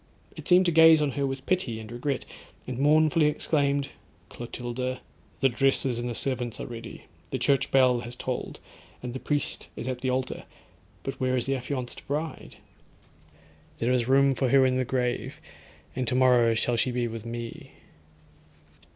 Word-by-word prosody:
It - - -9
seemed 185 0 +6
to 175 - +3
gaze 160 0 +7
on 150 -2 +1
her 140 +1 -1
with 135 0 -5
pity, 135 -12 0
an 110 - -8
regret, 125 +3 -3 0.4
and 125 -1 -5
mournfully 155 +2 +4
exclaimed—'Clotilda, 130 -4 -3 0.4
the 135 - +5
dresses 130 -1 +1
and 120 +1 -3
the 120 - -4
servants 125 -3 -2
are - - -4
ready, 115 -1 -8 0.3
the 130 - -2
church 140 +2 +2
bell 130 -2 +4
has 120 +1 -8
tolled, 125 0 -4 0.4
and 125 -1 -4
the 130 - -4
priest 145 +1 -2
is 120 - -6
at 125 -1 -3
the 130 - 0
altar, 130 0 -2 0.6
but 135 -1 -5
where 130 0 +1
is 120 - -1
the 135 - 0
affianced 130 -1 -5
bride? 155 +3 -4 1.2
There 120 +2 0
is 120 -2 +1
room 135 +1 +4
for 130 -1 0
her 135 +1 +5
in 130 0 +2
the 130 - 0
grave, 125 -1 -2 0.6
and 130 -2 -2
tomorrow 125 -2 +4
shall 120 +1 +1
she 125 - +1
be 120 -1 -1
with 115 -1 -6
me.' 115 0 -7
130 Hz, 170 wpm, -27 LUFS, 120-140 Hz, 1.2 s, gaze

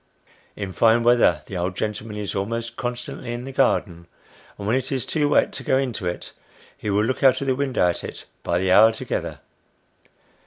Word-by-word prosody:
In 100 -2 -5
fine 115 +3 +4
weather 115 -10 +4
the 95 - -8
old 90 +1 -2
gentleman 105 0 -3
is 105 -1 -3
almost 115 +4 -3
constantly 120 0 -5
in 120 +1 -5
the 135 - -7
garden; 90 -10 0 0.5
and 100 - -7
when 110 +4 +2
it 130 - -2
is 130 -4 -1
too 150 -2 0
wet - - +3
to - - -6
go 130 - +2
into 125 -8 -2
it, 90 - -5 0.4
he 105 - -5
will 100 +1 +2
look 130 +3 -1
out 130 -2 +5
of 140 - -3
the 130 -1 +1
window 135 -8 +1
at 85 - -2
it, - - -8 0.2
by 85 - 0
the 95 +1 +1
hour 110 +4 +7
together. 110 - -4
115 Hz, 200 wpm, -23 LUFS, 100-130 Hz, 0.5 s, hour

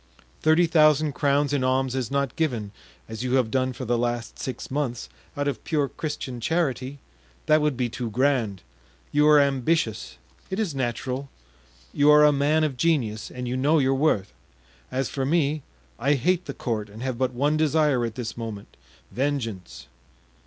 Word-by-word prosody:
Thirty 160 +3 +4
thousand 155 -2 +4
crowns 145 0 +1
in 140 -3 +1
alms 130 0 +1
is 130 -4 -2
not 140 -2 -1
given, 120 -11 -1 0.4
as 110 +1 -6
you 125 0 -1
have 125 -4 +1
done 130 -1 +1
for 125 +1 -7
the 120 0 0
last 120 -1 -3
six 130 -1 -6
months, 130 - -2 0.3
out 145 0 -1
of 145 - -3
pure 145 -3 0
Christian 145 -5 -5
charity; 140 -2 -1 0.5
that 155 0 +4
would 150 -4 0
be 125 -1 0
too 120 0 -5
grand. 115 -6 0 0.5
You 150 +1 +4
are 150 -1 +7
ambitious—it 135 - -1
is 210 -8 -1
natural; 130 +1 -3 0.6
you 145 +1 +4
are 150 0 +7
a 150 - +6
man 145 +3 +2
of 145 -4 -1
genius 120 -9 0
and 125 -1 -6
you 125 - -2
know 145 +5 +3
your 135 -2 +3
worth. 135 - +1 0.6
As 130 0 -1
for 135 - -3
me, 150 +1 +1 0.4
I 140 +5 +2
hate 180 +7 +1
the 140 - -6
court 110 -4 -3
and 110 +4 -9
have 130 -2 -3
but 130 -1 0
one 145 +5 +1
desire 150 -4 +2
at 115 -2 -3
this 115 -2 -5
moment—vengeance. 115 - -5
135 Hz, 170 wpm, -25 LUFS, 120-150 Hz, 0.6 s, are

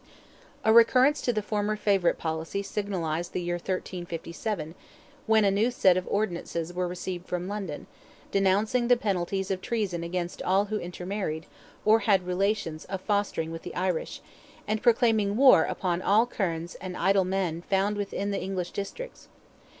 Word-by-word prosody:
A 220 - +4
recurrence 255 +5 +5
to 245 - +1
the 215 -3 -2
former 210 0 -1
favourite 200 -4 +2
policy 160 +4 -3
signalized 175 -5 -3
the 180 - -1
year 175 0 -1
1357, 175 -1 -4 0.5
when 220 -1 +5
a 200 - +4
new 210 +5 +2
set 190 -7 +4
of 185 0 -2
ordinances 175 -4 -2
were 180 0 -1
received 180 0 -5
from 180 0 -3
London, 195 -7 -5 0.5
denouncing 205 +5 +2
the 245 0 +5
penalties 195 -2 -1
of 185 -1 -2
treason 195 -8 -2
against 175 0 -3
all 195 +2 +2
who 215 +1 -2
intermarried, 180 -2 -4 0.4
or 220 +1 +6
had 200 -4 +2
relations 180 -3 -1
of 195 0 -4
fosterage 205 -6 -1
with 165 0 -6
the - - -8
Irish; 180 -2 -2 0.5
and 215 0 -1
proclaiming 225 -4 +3
war 255 -11 +7
upon 180 -2 -1
all 210 +5 +4
kernes 170 -7 -3
and 185 -1 -5
idle 195 0 +3
men 185 -3 -1
found 195 +3 0
within 200 0 -3
the 200 - -2
English 185 -2 -3
districts. 460 - -7
195 Hz, 160 wpm, -27 LUFS, 175-210 Hz, 0.5 s, war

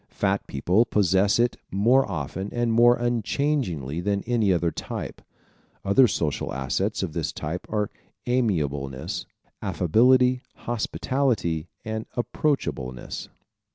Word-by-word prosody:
Fat - - -1
people 90 - +2
possess 100 -2 +3
it 120 0 +2
more 115 +6 +3
often 90 +4 -4
and 120 -1 0
more 120 +1 +6
unchangingly 120 - -1
than 100 +2 -1
any 115 -5 +2
other 85 -2 +1
type. - - -6 0.6
Other 110 +6 +6
social 75 -8 -1
assets 65 -1 -1
of - - -3
this - - -2
type 80 +4 -5
are 105 -2 0 0.3
amenableness, 75 - -1 0.3
affability, 125 +8 +3
hospitality 115 - -1 0.2
and 110 0 -4
approachableness. 120 - -2
105 Hz, 110 wpm, -25 LUFS, 85-120 Hz, 0.6 s, more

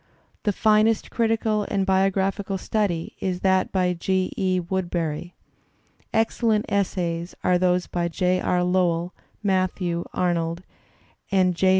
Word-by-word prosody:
The 210 - +3
finest 215 +2 +2
critical 225 -2 +1
and 195 -2 0
biographical 195 +1 +1
study 185 -4 -1
is 180 -1 -2
that 190 -1 +2
by 180 -1 +1
G. 185 +2 0
E. 185 -1 +1
Woodberry. 175 -2 -3 0.8
Excellent 225 -1 +1
essays 175 -3 -1
are 180 -1 +3
those 180 0 +2
by 175 -1 -2
J. 180 +2 0
R. 180 0 +1
Lowell, 180 -1 +1 0.3
Matthew 185 -3 0
Arnold, 170 -1 -1 0.7
and 185 -2 +3
J. 185 +2 +3
185 Hz, 120 wpm, -24 LUFS, 175-195 Hz, 0.8 s, The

